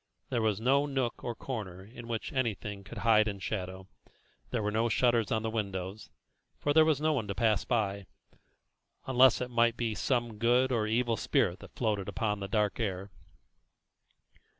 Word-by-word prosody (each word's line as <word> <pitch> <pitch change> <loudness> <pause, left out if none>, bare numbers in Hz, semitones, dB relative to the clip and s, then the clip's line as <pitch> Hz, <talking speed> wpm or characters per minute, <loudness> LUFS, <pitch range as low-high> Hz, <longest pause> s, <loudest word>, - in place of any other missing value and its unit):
There 120 - 0
was 110 -2 +1
no 135 +5 +3
nook 130 -4 -2
or 120 -1 -3
corner 95 -9 -6
in 115 +2 -11
which 115 +6 -4
anything 105 - -2
could 115 - -10
hide 110 -1 +5
in 100 -2 -3
shadow; 95 -1 -5 0.6
there 115 -4 -1
were 105 - 0
no 115 +2 +1
shutters 115 -2 +2
on 110 -1 +1
the 110 - -1
windows, 100 -2 -4 0.5
for 145 - 0
there 160 +1 +7
was 155 -3 +2
no 155 +1 +2
one 120 -8 -2
to 100 - -3
pass 110 -1 +2
by, 100 -5 -1 1.0
unless 130 -1 +5
it 125 0 -3
might 120 -1 +3
be 115 -2 -1
some 120 -1 -1
good 125 +3 +3
or 110 -3 +1
evil 115 +1 +1
spirit 90 -1 +1
that - - -14
floated 105 -5 -1
upon 105 -3 -1
the 100 - -4
dark 105 +1 0
air. 100 -3 -3
110 Hz, 175 wpm, -30 LUFS, 105-120 Hz, 1.0 s, there